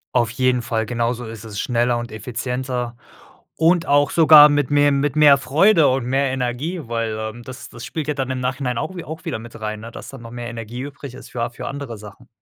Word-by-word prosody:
Auf 120 -3 +3
jeden 125 +1 +1
Fall. 115 -2 -1
Genauso 120 +1 -2
ist 110 0 -9
es, 105 -2 -7
schneller 120 0 +1
und 120 0 -6
effizienter 125 +2 -4 0.6
und 165 +1 +3
auch 145 0 +3
sogar 155 -2 +9
mit 145 -3 +1
mehr 145 0 +4
mit 140 0 0
mehr 145 -2 +7
Freude 160 +3 +4
und 130 -1 0
mehr 135 +3 +1
Energie, 130 +7 -3
weil, 115 -2 -2
ähm, 110 +2 -5
das 130 +1 -10
das 120 - -11
spielt 155 +1 -5
ja 150 - 0
dann 135 -2 -3
im 130 - -2
Nachhinein 125 -1 -2
auch 190 - -4
wie 175 - -6
auch 160 +3 -8
wieder 160 -9 -3
mit 115 0 -11
rein, 110 0 -4
ne, 115 - -9
dass - - -10
da 135 - -10
noch 115 0 -10
mehr 120 -1 -6
Energie 115 +1 -7
übrig 140 -2 -8
ist - - -12
für 120 - -4
a 120 - 0
für 120 - -8
andere 135 -5 -6
Sachen. 105 +4 -13
125 Hz, 230 wpm, -21 LUFS, 115-145 Hz, 0.6 s, sogar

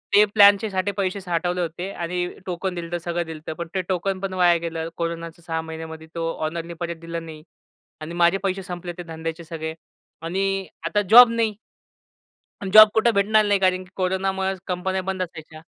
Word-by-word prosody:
ते 210 - +8
प्लॅनच्यासाठी 200 -1 +4
पैसे 195 0 -1
साठवले 175 0 -1
होते 175 +3 -4
आणि 175 +1 -2 0.2
टोकन 180 0 -3
दिलं 170 0 -6
तर 175 - 0
सगळं 170 0 -3
दिलं 160 -1 -8
होतं, 160 0 -6
पण - - -12
ते 185 - +1
टोकन 185 +1 -1
पण 195 -1 -4
वाया 175 -2 +4
गेलं. 165 -1 -4
कोरोनाच्या 170 0 -4
6 160 -1 -2
महिन्यांमध्ये 160 0 -8
तो 165 0 -1 0.2
ओनरनी 170 +1 -4
परत 170 -1 -3
दिलं 165 0 -5
नाही 155 -1 -10 0.6
आणि 160 +2 -7
माझे 175 +2 +3
पैसे 195 0 -1
संपले 175 -1 -6
ते - - -4
धंद्याचे 165 0 -6
सगळे 160 -1 -5 0.5
आणि 195 +2 -1 0.2
आता 205 +4 +1
जॉब 245 +1 +10
नाही. 225 -2 0 1.1
अन 190 - -3
जॉब 215 0 +11
कुठे 225 +2 +4
भेटणार 215 +2 +3
नाही 205 -1 +2
कारण 185 0 +2
की 185 - -20
कोरोनामुळे 190 +1 0
कंपन्या 190 +1 -2
बंद 185 -1 -2
असायच्या. 155 -2 -8
175 Hz, 185 wpm, -23 LUFS, 165-195 Hz, 1.1 s, जॉब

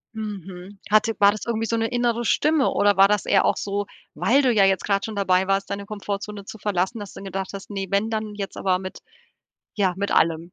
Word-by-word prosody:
Mhm. 195 -3 -7
Hatte 215 +1 +3
war 200 0 +6
das 215 - -6
irgendwie 225 -1 -1
so 230 - -1
'ne 225 0 0
innere 240 -1 0
Stimme 300 +4 +2
oder 205 -1 +2
war 195 0 +7
das 210 -1 0
eher - - +3
auch - - +2
so, 200 0 -3 0.3
weil 275 +4 +3
du 255 - +4
ja 205 - +4
jetzt 195 -2 +2
gerade 200 -1 +1
schon 220 - -5
dabei 190 -2 +2
warst, 195 0 0
deine 200 0 -5
Komfortzone 205 0 -5
zu 220 - -10
verlassen, 205 +3 -1
dass 205 - -8
du - - -13
dann 195 - -10
gedacht 195 -1 -4
hast: 195 +1 -8
„Ne, 195 -1 -4
wenn 200 +2 +1
dann 215 -1 -3
jetzt, 200 -1 -5
aber 185 -1 +1
mit 185 0 -8 0.8
ja, 190 -3 +1
mit 200 +1 -2
allem. 165 +1 +1
200 Hz, 235 wpm, -23 LUFS, 195-215 Hz, 0.8 s, war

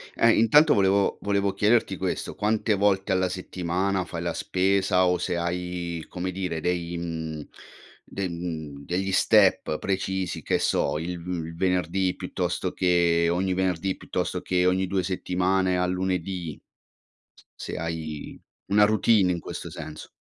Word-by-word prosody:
Ehm, 115 0 +4
intanto, 145 +8 +6
volevo 100 0 +2
volevo 100 -1 0
chiederti 105 -3 +2
questo, 95 0 -3
quante 105 +1 +1
volte 100 -1 +1
alla 95 -1 +2
settimana 90 +1 -2
fai 85 -1 -6
la 85 -1 -2
spesa 95 0 +2
o 90 0 +2
se 90 0 -2
hai, 85 -1 -3
come 90 +1 -4
dire, 90 -3 -3
dei 85 0 -1
mhmm, 80 -2 -4 0.6
de 95 -2 -4
mhmm, 80 -5 -6
degli 95 +2 -1
step 95 -5 +3
precisi, 95 -1 -2
che - - +1
so, 75 - +1
il 90 +2 -4
uhm, 85 -1 -4
il 80 - -8
venerdì 90 +1 0
piuttosto - - -3
che 85 -2 +3
ogni 95 +1 0
venerdì 95 0 -1
piuttosto - - -3
che 90 0 +1
ogni 95 +1 +2
2 95 +1 0
settimane 95 0 0
al 90 0 +1
lunedì. 90 -3 -3 0.8
S - - -21
se - - -6
hai 80 -2 -5 0.3
una 105 +1 +5
routine 110 -2 +3
in 85 - -2
questo - - -7
senso. 75 0 -8
90 Hz, 150 wpm, -26 LUFS, 85-95 Hz, 0.8 s, intanto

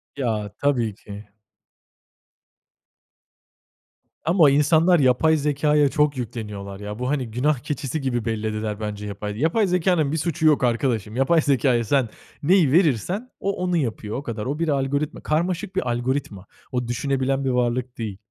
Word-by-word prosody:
Ya 110 -6 -2
tabii 120 -8 +1
ki. 105 +1 -11 3.0
Ama 165 -3 +5
insanlar 160 +4 +4
yapay 140 +5 +4
zekâya 150 0 +2
çok 150 -2 +1
yükleniyorlar 105 -5 -6
ya. 105 +2 -7
Bu 125 +1 -2
hani 130 -6 -2
günah 130 +3 +1
keçisi 140 +2 -4
gibi 120 -4 -2
bellediler 110 -1 -2
bence 105 -1 -5
yapay 105 +1 -5
yapay 175 - +2
zekânın 175 -4 +1
bir 160 - -1
suçu 160 0 -1
yok 150 -4 +4
arkadaşım. 115 -3 0
Yapay 155 +5 +3
zekâya 130 -4 +2
sen 125 0 +1 0.3
neyi 170 -4 +4
verirsen 175 - +1
o 200 - -1
onu 180 -1 +1
yapıyor 110 -6 -3
o 140 - -5
kadar. 110 -3 -5
O 145 +4 -3
bir 165 - 0
algoritma. 140 +1 -1
Karmaşık 175 +4 -1
bir 125 -10 -1
algoritma. 120 -5 -2 0.3
O 125 -2 -2
düşünebilen 135 +2 -1
bir - - +1
varlık 125 0 -1
değil. 110 -4 -5
135 Hz, 145 wpm, -23 LUFS, 115-150 Hz, 3.0 s, Ama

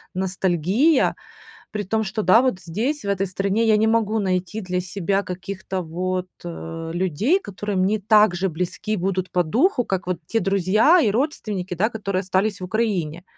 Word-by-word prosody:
ностальгия, 190 - +2 0.6
при 210 -1 -2
том, 220 +3 0
что 215 +2 -3
да, 185 +5 +6
вот, 255 -8 0
здесь, 225 - -2
в - - -4
этой 195 -1 0
стране 195 +4 0
я 215 - +5
не 220 - +3
могу 225 -1 +1
найти 185 +2 -1
для 180 -1 -2
себя 195 +2 -1
каких-то 190 0 -5
вот, 180 +2 -3 0.2
э, 165 -1 -6
людей, 190 - +1
которые 205 - -5
мне 195 +3 +1
так 210 -2 +5
же 190 +2 0
близки 180 +6 -3
будут 185 0 -2
по 180 -1 +2
духу, 245 - +2
как 190 -1 -2
вот 180 -2 -1
те 225 - 0
друзья 200 - +4
и 215 - +3
родственники, 210 - -2
да, 215 +7 +1
которые 200 -4 -2
остались 195 +1 0
в - - -4
Украине. 180 -5 -1
195 Hz, 175 wpm, -22 LUFS, 180-215 Hz, 0.6 s, да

